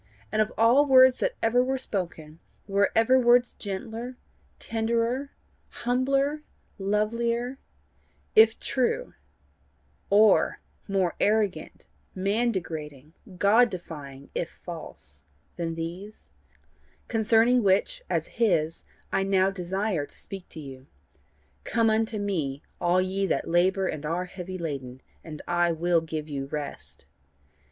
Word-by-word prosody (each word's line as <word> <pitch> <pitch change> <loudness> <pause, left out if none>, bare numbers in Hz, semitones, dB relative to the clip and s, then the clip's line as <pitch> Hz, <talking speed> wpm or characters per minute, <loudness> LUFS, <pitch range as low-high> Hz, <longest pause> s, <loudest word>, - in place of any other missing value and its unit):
And 215 - +2
of 215 - 0
all 245 +6 +5
words 260 -1 +7
that - - 0
ever 240 +2 +4
were 265 +1 -1
spoken, 170 -9 -5 0.3
were 200 0 +2
ever 240 +4 +5
words 245 0 +4
gentler, 225 +5 -6 0.4
tenderer, 230 +4 -1 0.4
humbler, 275 +4 0 0.4
lovelier 235 +5 -1 0.8
if 220 +1 +6
true, 265 - -1 1.0
or 210 +1 +4 0.3
more 190 -3 +1
arrogant, 205 -6 0 0.3
man 205 +6 +1
degrading, 155 - -6 0.2
God 225 +6 +5
defying 145 -7 -9
if 170 - -2 0.2
false, 75 - -10 0.3
than 165 -1 -3
these, 175 +6 -7 0.8
concerning 225 +2 +3
which, 205 - +2
as - - 0
his, 165 -8 +1 0.3
I - - +1
now 195 0 +2
desire 190 -3 -2
to - - -14
speak 195 -2 -8
to - - -9
you: 135 -3 -10 0.8
'Come 225 -1 +2
unto 220 0 0
me, 160 -9 -2 0.2
all 180 +1 +3
ye 195 +1 -1
that - - -1
labour 185 +3 +2
and 150 - -4
are 170 +4 -2
heavy 185 0 -7
laden, 135 -6 -5 0.2
and 155 -2 -9
I 175 0 +2
will 170 +1 +2
give 155 -1 -5
you 140 -2 -4
rest. 140 - -5
195 Hz, 120 wpm, -27 LUFS, 165-230 Hz, 1.0 s, words